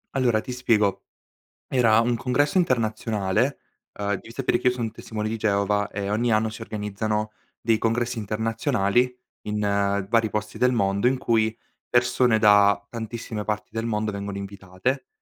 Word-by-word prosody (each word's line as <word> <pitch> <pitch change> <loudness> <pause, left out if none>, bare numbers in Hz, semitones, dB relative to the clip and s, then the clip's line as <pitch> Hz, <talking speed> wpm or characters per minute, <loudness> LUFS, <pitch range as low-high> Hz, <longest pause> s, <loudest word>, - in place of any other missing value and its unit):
Allora 120 -5 +2
ti 125 - -7
spiego: 110 -6 +1 0.6
era 115 -4 +4
un 120 0 +1
congresso 145 +8 0
internazionale. 110 - +1 0.4
Uhm, 100 0 -1
devi 115 - -8
sapere 125 -1 0
che 125 - +2
io - - +2
son 115 -3 -3
testimone 110 -1 -5
di 115 - -2
Geova 105 -1 +1
e 100 0 -4
ogni 115 +2 +1
anno 110 +1 +2
si 110 +1 -8
organizzano 105 0 -3 0.3
dei 115 -1 +2
congressi 120 +2 0
internazionali, 110 +2 0 0.3
in 105 0 -3 0.5
vari 115 -1 +2
posti 105 0 -4
del 125 0 +3
mondo, 100 0 +1
in 130 0 0
cui 110 -2 +1 0.4
persone 120 -1 +3
da 100 -2 +5
tantissime 115 -2 -5
parti 105 0 -3
del 115 0 -3
mondo 105 -2 -1
vengono 100 0 -5
invitate 100 - -4
110 Hz, 155 wpm, -24 LUFS, 105-120 Hz, 0.6 s, da